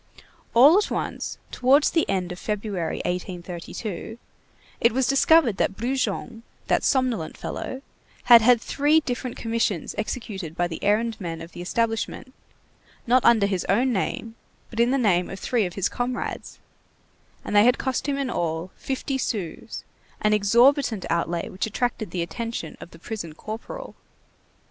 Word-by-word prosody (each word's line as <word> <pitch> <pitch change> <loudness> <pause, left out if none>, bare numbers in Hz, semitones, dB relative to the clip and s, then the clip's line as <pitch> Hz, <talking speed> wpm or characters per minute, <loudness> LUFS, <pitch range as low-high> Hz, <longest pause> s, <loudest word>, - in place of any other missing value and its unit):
All 290 - +8
at 420 - -1
once, - - -3
towards 270 +4 +4
the 325 - +1
end 185 -2 -1
of 180 - -7
February, 205 -5 -3
1832, 180 +3 -5 0.6
it 235 - +3
was 265 +1 +2
discovered 275 -3 +4
that 195 - 0
Brujon, 245 -1 -2 0.2
that - - +1
somnolent 250 - 0
fellow, 260 +1 -5 0.4
had 235 -2 +9
had 240 +1 +5
three 295 +6 +2
different 250 -2 -4
commissions 225 -6 -1
executed 200 -7 -4
by 175 - +1
the 165 -2 -7
errand 215 +2 +1
men 165 -3 -4
of 165 +1 -9
the - - -8
establishment, 230 +6 -2 0.7
not 250 +1 +4
under 225 -4 +5
his 190 -3 -1
own 245 +6 +3
name, 225 +3 -2 0.4
but 225 - -6
in 235 +1 +4
the 270 - +2
name 185 -8 +2
of 195 - -7
three 225 -3 +1
of 175 - -10
his 195 -1 +1
comrades; 245 0 -4 0.9
and - - -3
they 205 - +7
had 245 +2 +4
cost 265 +2 -2
him 280 - 0
in 275 -3 -2
all 165 0 -2
fifty 265 0 -3
sous, 195 -10 -4 0.4
an 215 0 +2
exorbitant 235 +2 +3
outlay 170 0 -1
which 190 - -3
attracted 220 -2 -2
the 170 0 -2
attention 230 -2 -5
of - - -9
the 165 - -14
prison 170 -3 -6
corporal. 225 - -7
225 Hz, 155 wpm, -24 LUFS, 185-250 Hz, 0.9 s, had